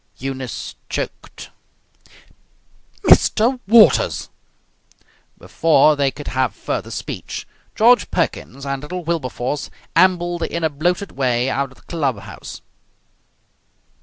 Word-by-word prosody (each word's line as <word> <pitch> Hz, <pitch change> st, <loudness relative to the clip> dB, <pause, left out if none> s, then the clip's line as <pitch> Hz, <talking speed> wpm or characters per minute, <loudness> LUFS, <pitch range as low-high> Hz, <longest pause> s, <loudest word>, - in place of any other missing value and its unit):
Eunice 130 Hz, -1 st, -5 dB, 0.2 s
choked. -, -, -6 dB, 1.5 s
"Mr. 245 Hz, +4 st, +4 dB
Waters!" 230 Hz, -, +5 dB, 1.1 s
Before 155 Hz, -2 st, +3 dB
they 140 Hz, -1 st, +2 dB
could 145 Hz, +3 st, -8 dB
have 130 Hz, -5 st, 0 dB
further -, -, -4 dB
speech -, -, -6 dB, 0.3 s
George 240 Hz, +3 st, +5 dB
Perkins 140 Hz, -5 st, -2 dB
and 140 Hz, -1 st, -3 dB
little 180 Hz, +4 st, -6 dB
Wilberforce 145 Hz, -4 st, -3 dB, 0.3 s
ambled 175 Hz, -1 st, +3 dB
in 170 Hz, 0 st, -2 dB
a 160 Hz, -, +1 dB
bloated 175 Hz, +7 st, -1 dB
way 125 Hz, -1 st, 0 dB
out 140 Hz, -1 st, -1 dB
of -, -, -17 dB
the -, -, -22 dB
clubhouse. 125 Hz, -, -4 dB
150 Hz, 105 wpm, -20 LUFS, 135-175 Hz, 1.5 s, Waters